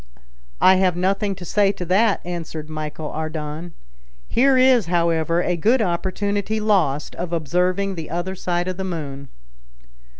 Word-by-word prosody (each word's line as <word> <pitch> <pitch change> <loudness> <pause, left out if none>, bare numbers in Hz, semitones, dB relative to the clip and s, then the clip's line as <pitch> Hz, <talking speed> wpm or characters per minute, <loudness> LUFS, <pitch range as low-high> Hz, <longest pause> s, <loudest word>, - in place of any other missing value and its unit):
"I 185 0 +6
have 185 -2 +2
nothing 195 +2 0
to 180 - -9
say 200 +3 +2
to 180 - -6
that," 200 +4 +2
answered 160 -3 -6
Michel 155 0 -5
Ardan. 155 +1 -5 0.5
"Here 265 +2 +3
is, 255 -6 +5
however, 170 0 +1
a 180 - 0
good 225 +10 +3
opportunity 200 +2 -1
lost 180 -10 +1
of 175 0 -4
observing 180 +5 0
the 165 -4 -7
other 175 +3 -3
side 175 -1 -2
of 185 -1 -3
the 190 - -3
moon." 140 -7 -5
180 Hz, 145 wpm, -22 LUFS, 160-195 Hz, 0.5 s, I